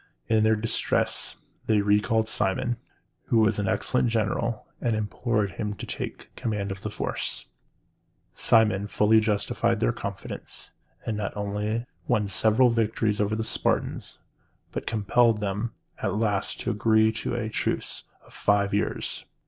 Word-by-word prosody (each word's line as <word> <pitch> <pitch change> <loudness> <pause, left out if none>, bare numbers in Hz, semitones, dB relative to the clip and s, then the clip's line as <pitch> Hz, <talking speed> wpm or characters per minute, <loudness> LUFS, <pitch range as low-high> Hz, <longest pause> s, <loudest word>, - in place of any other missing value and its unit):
In 110 -1 +3
their 110 0 +4
distress 110 +1 0 0.3
they 110 -1 +4
recalled 105 +2 +2
Cimon, 115 +4 0 0.5
who 115 - +2
was 110 -2 +3
an 100 - 0
excellent 125 +6 +1
general, 115 0 0 0.2
and 120 -3 +1
implored 110 -1 0
him 105 +1 -3
to - - -7
take - - -6
command 105 -3 -2
of 95 0 -6
their 105 - -3
forces. - - -3 0.9
Cimon 105 -3 +3
fully 105 +2 +4
justified 110 +2 +1
their 115 - +2
confidence, 100 -4 -7 0.3
and 110 - -1
not 105 0 -3
only 105 +3 -2 0.2
won 110 -6 +2
several 110 +5 +4
victories 110 -2 +1
over 105 +1 +1
the 110 - -1
Spartans, 110 - 0 0.5
but - - -5
compelled 110 +1 +3
them 105 +3 -2 0.3
at - - 0
last 105 -2 0
to 120 - -1
agree 110 0 +4
to 110 +2 -3
a 120 -2 -2
truce - - -2 0.2
of - - -19
five 100 -1 +2
years. 100 - -1
110 Hz, 145 wpm, -26 LUFS, 105-115 Hz, 0.9 s, their